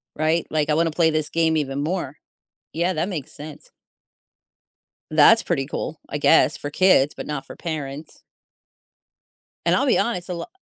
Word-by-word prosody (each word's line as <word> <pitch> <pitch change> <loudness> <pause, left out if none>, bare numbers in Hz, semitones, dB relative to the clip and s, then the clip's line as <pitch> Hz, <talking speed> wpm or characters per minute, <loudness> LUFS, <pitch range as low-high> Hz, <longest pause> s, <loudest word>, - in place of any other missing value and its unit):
right? 160 +2 0
Like, 155 -1 0
I - - +3
wanna 165 +1 +1
play 160 0 +2
this 155 -1 -1
game 165 -1 +1
even 140 -1 -2
more." 155 -3 -3 0.6
Yeah, 175 +3 0
that 165 +6 -2
makes 155 -8 -6
sense. 150 0 -11 1.4
That's 160 +9 +6
pretty 135 -6 -1
cool, 155 +2 -5
I 145 - -4
guess 160 - +4
for 145 - -6
kids, 150 -5 +3
but - - -7
not 150 -2 -4
for - - -12
parents. 150 -3 -6 1.4
And - - +4
I'll 275 - +1
be - - +3
honest, 185 -7 -2
a 180 - -3
lot 170 - -6
155 Hz, 170 wpm, -22 LUFS, 150-170 Hz, 1.4 s, That's